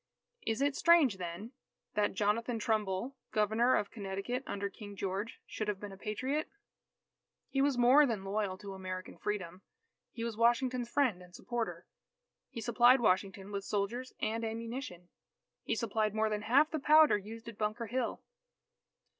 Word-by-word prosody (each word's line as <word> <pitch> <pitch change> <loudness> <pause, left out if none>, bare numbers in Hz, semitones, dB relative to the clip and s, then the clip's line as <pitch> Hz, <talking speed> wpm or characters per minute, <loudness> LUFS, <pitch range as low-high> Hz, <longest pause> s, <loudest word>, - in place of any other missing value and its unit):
Is 225 +4 +1
it 285 -1 +1
strange, 325 - +5
then, 180 +6 -6 0.4
that 205 -2 +1
Jonathan 225 +4 +1
Trumbull, 215 +3 -1 0.2
Governor 220 +4 +3
of 205 - -1
Connecticut 200 +4 -3
under 200 0 -2
King 205 0 -10
George, 195 +3 -3
should 215 - -4
have 205 -2 -1
been 205 -1 -7
a - - -9
Patriot? 260 +10 -2 1.0
He 270 - +1
was 280 -2 +2
more 260 +5 +6
than 220 -5 -2
loyal 195 -1 -2
to 195 0 -8
American 185 -1 -6
freedom. 185 -3 -3 0.5
He 230 - -6
was 230 -2 -3
Washington's 240 +1 +2
friend 240 -10 +1
and 180 0 -14
supporter. 240 -2 -4 0.6
He 235 -4 -6
supplied 240 +3 +5
Washington 195 -2 0
with 200 -1 -3
soldiers 220 +6 -2
and 225 +2 -1
ammunition. 225 -5 -5 0.5
He - - -1
supplied 215 -1 0
more 220 0 +1
than 210 0 -1
half 275 +8 +4
the 315 - -1
powder 305 0 +6
used 220 +3 -7
at 230 -3 -9
Bunker 215 +2 -1
Hill. 250 +4 -2
220 Hz, 155 wpm, -33 LUFS, 200-245 Hz, 1.0 s, more